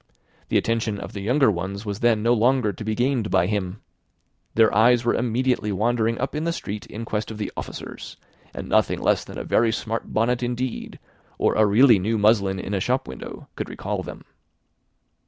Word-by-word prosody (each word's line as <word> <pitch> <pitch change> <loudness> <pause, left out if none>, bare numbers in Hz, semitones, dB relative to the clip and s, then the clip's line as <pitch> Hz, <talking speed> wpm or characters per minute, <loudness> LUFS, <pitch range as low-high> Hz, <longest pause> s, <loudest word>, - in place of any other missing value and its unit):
The - - +3
attention 115 -3 0
of - - -8
the 100 - -5
younger 125 +3 +3
ones 95 +3 -4
was 100 0 -4
then 115 -3 +2
no 120 +1 +4
longer 120 -2 +2
to 100 - -8
be 110 0 -2
gained 125 -3 0
by 85 - +3
him. 100 0 -3 0.7
Their 110 -1 +5
eyes 120 +3 +4
were 120 - +3
immediately 125 -2 0
wandering 115 +3 +1
up 135 - -2
the 160 +3 -1
street 105 -10 -6
in 115 +2 -7
quest 110 0 -3
of 110 - -7
the 105 - -4
officers, - - -7 0.3
and - - -7
nothing - - +2
less - - +2
than - - -10
a - - -4
very 115 0 +2
smart 115 0 -4
bonnet, 120 +3 +1
indeed, 125 0 -3 0.4
or - - +2
a 110 -1 +4
really 115 +1 +6
new 110 +5 0
muslin 100 -2 +3
in 100 - -5
a 100 - +1
shop 125 +7 0
window, 65 - -9
could - - -4
recall - - -4
them. - - -9
110 Hz, 190 wpm, -23 LUFS, 105-120 Hz, 0.7 s, really